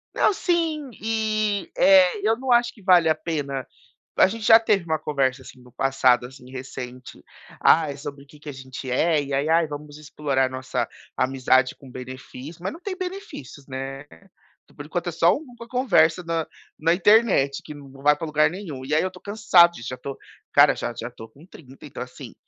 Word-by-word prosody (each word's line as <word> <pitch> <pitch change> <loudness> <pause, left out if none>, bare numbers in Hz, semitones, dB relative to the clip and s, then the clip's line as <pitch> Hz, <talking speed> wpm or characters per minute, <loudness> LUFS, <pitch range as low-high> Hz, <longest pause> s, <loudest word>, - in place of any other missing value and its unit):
Não, - - +3
sim. 325 -6 -1
E, 215 -2 -1
é, 190 0 +5
eu 225 - +3
não 260 0 -3
acho 240 0 +3
que 215 - -19
vale 180 -3 +5
a - - +5
pena. 145 -5 -4 0.5
A - - +6
gente 220 +3 -6
já 225 0 +8
teve 210 -4 +1
uma 160 -1 0
conversa 135 -3 -1
assim 130 - -14
no 125 0 -18
passado, 130 -2 +2
assim, 125 -1 -15
recente: 130 -1 -9 0.4
"Ai, 155 -3 +4
é - - -12
sobre 140 -1 -8
o - - -31
que 150 +1 -17
que 150 - -9
a - - -6
gente 130 0 -8
é". 155 +4 +2
E 140 0 -6
aí: 140 +2 0
“Ai, 165 0 +3
vamos 145 0 -9
explorar 140 -3 -1
nossa 130 0 -3 0.3
amizade 130 0 +2
com 135 - -15
benefício”. 130 +5 -10
Mas 190 - -3
não 325 - -11
tem 375 0 -5
benefícios, 360 - -8
né? 135 +1 -6 0.7
Por 145 - -9
enquanto 175 +2 -3
é - - -4
só 170 +2 +4
uma 245 -6 -12
conversa 185 -9 +2
na 165 -1 -2 0.3
na 165 +2 +3
internet 195 -8 +3
que 150 - -9
não 140 -2 -12
vai 150 0 +5
pra 165 - -5
lugar 150 0 +3
nenhum. 170 -8 -7
E 150 +3 -1
aí 155 - +3
eu - - 0
estou - - -16
cansado 200 -5 +4
disso. 115 - -7
Já 125 - -5
estou, 135 +2 -7 0.4
cara, - - +6
já 120 - -4
já 115 0 -5
estou 115 -2 -12
com 150 +4 -18
30. 135 -8 -15
Então, 140 - -9
assim, 125 0 -11
150 Hz, 205 wpm, -23 LUFS, 135-195 Hz, 0.7 s, já